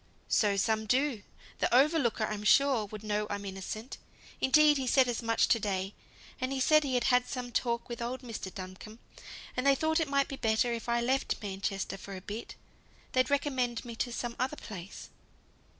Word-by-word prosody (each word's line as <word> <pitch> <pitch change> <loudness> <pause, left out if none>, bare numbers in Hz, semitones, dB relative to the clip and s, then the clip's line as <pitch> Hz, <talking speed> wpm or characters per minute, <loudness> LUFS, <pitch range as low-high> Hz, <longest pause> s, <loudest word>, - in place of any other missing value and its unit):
"So 205 -2 +3
some 220 +2 +1
do; 260 -2 +1 0.4
the - - +1
overlooker, 265 -3 +3
I'm 210 -1 -4
sure, 260 0 +4
would 215 +1 -9
know 210 0 -1
I'm 200 0 -4
innocent. 195 +5 -6 0.4
Indeed, 295 +2 +5
he 265 -2 -2
said 260 +1 +5
as 240 -1 -2
much 230 -1 +2
to 230 - +4
day; 195 -1 -2 0.5
and 255 +1 -2
he 270 - -1
said 305 +3 +5
he 265 -3 -1
had 245 - +2
had 250 0 +3
some 250 -2 -5
talk 235 0 -1
with 235 -1 -6
old 245 +2 -3
Mr. 225 -5 -6
Duncombe, 185 +4 -9 0.6
and 255 +2 0
they 275 - +6
thought 315 +3 +1
it 320 -3 -1
might 280 0 +2
be 275 - -6
better 225 +1 +1
if 230 0 -5
I 235 0 +2
left 260 +3 0
Manchester 195 -1 -3
for 195 +1 -8
a 185 - -7
bit; 210 +4 -7 0.6
they'd 255 +1 +2
recommend 260 -4 0
me 235 -1 -7
to 245 - -1
some 235 0 -4
other 265 +4 -1
place." 190 -3 -9
235 Hz, 195 wpm, -30 LUFS, 210-265 Hz, 0.6 s, they